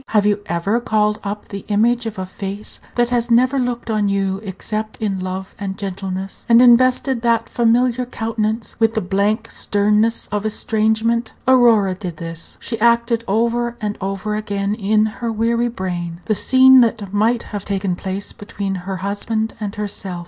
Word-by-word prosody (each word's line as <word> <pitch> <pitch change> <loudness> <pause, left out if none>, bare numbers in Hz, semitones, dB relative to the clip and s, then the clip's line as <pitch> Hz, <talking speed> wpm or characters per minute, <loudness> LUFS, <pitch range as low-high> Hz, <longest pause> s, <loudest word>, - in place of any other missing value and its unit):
Have 210 -2 +2
you 205 0 +2
ever 185 +7 0
called 210 -2 +1
up 205 +1 -5
the 200 -1 -6
image 230 +3 +2
of 220 - -6
a 190 - -3
face 195 +2 -6 0.2
that 240 0 +1
has 240 -1 0
never 255 +3 +3
looked 245 -2 -2
on 210 -2 +1
you 195 -1 0
except 215 +2 -5
in 200 -3 -2
love 185 +1 -5
and 195 -1 -4
gentleness, 195 0 -5
and 230 0 +7
invested 250 +1 +4
that 230 -1 +1
familiar 245 +1 +2
countenance 225 -1 -2
with 225 -1 +3
the - - +2
blank 205 +4 0
sternness 210 +2 +1
of 210 0 -1
estrangement? 220 +1 0
Aurora 235 -7 +5
did 180 -3 -6
this. 165 0 -7
She 230 -2 -4
acted 235 0 +3
over 235 +3 0
and 210 -1 -2
over 195 +2 -3
again 205 -1 -2
in 215 0 +2
her 225 +2 -3
weary 230 +2 +1
brain 175 -5 -4
the 215 - +1
scene 260 +4 +6
that 215 -4 0
might 225 +3 +2
have 205 -2 -3
taken 195 -3 -1
place 190 +2 -4
between 200 -1 -5 0.2
her 190 - -2
husband 220 +2 -2
and 205 -1 -4
herself. 200 -3 -4
215 Hz, 170 wpm, -19 LUFS, 195-235 Hz, 0.2 s, and